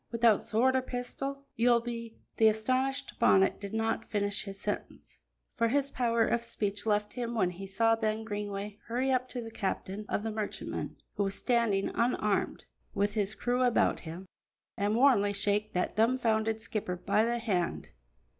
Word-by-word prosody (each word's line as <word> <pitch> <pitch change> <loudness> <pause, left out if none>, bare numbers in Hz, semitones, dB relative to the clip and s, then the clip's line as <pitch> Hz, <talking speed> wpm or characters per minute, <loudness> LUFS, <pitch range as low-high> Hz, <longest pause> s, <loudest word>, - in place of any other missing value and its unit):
Without 230 -2 +4
sword 255 +4 +2
or 260 - +3
pistol, 275 +2 -5
you'll 235 +1 +4
be 230 -1 -6
" - - -43
The 220 - +6
astonished 255 +5 0
Bonnet 190 0 +4
did 200 -1 -6
not 225 0 -1
finish 205 -1 0
his 195 -1 -7
sentence, 205 - -5 0.4
for 230 - +3
his 280 +3 +1
power 235 -2 +2
of 235 - +1
speech 205 -2 -2
left 210 0 +1
him 240 -1 -3
when 185 -5 +2
he 195 +2 -8
saw 225 +4 +3
Ben 220 0 -1
Greenway 205 -1 -5
hurry 255 +3 0
up 255 0 +1
to 250 - -5
the 225 -1 -8
captain 200 0 -3
of 205 - -1
the 225 - -2
merchantman, 215 -1 -4 0.2
who 200 - +2
was 195 0 -2
standing 230 -6 +1
unarmed, 215 -4 0 0.3
with 205 +1 +1
his 210 -1 0
crew 245 +2 0
about 245 -2 +3
him, 170 +3 -8 0.5
and 205 +2 0
warmly 230 -6 +4
shake 205 +1 0
that 180 - -1
dumfounded 225 -2 +2
skipper 210 -6 -2
by 195 +4 +1
the 235 +1 0
hand. 190 -7 -1
220 Hz, 175 wpm, -30 LUFS, 205-235 Hz, 0.5 s, The